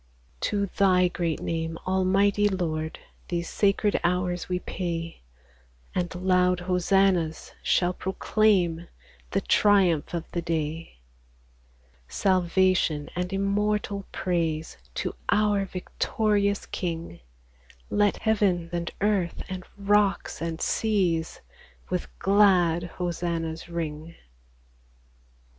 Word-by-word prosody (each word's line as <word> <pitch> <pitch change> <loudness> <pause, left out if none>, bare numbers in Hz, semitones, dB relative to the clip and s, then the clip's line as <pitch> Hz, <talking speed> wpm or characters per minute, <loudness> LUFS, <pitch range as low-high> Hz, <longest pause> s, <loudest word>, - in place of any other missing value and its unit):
^3 - - -33
To 200 - 0
Thy 185 -2 +3
great 170 -3 -2
name, 165 0 -2
Almighty 195 +2 +3
Lord, 160 -4 -2 0.3
These 170 -1 -2
sacred 205 +1 +2
hours 180 0 0
we 180 - +1
pay; 170 -2 -4 0.7
And 180 0 -2
loud 180 0 +2
hosannas 180 -2 +1
shall 180 0 +2
proclaim 185 -3 +1 0.4
The 195 - 0
triumph 185 -7 +3
of 170 - -2
the 170 - -2
day. 165 - -3 1.1
Salvation 185 -4 +1
and 180 +1 -2
immortal 200 0 -1
praise 165 -3 -1 0.2
To - - -2 0.2
our 205 -2 +3
victorious 200 +2 0
King! 165 - -4 0.7
Let 205 -1 +2
heaven 195 -6 +1
and 170 0 -2
earth, 200 -4 0
and 185 -1 -5
rocks 200 -2 +1
and 165 -1 -3
seas, 180 -7 0 0.5
With 180 -1 -1
glad 185 -4 +4
hosannas 170 -2 -3
ring 165 -1 -5
180 Hz, 100 wpm, -26 LUFS, 170-195 Hz, 1.1 s, glad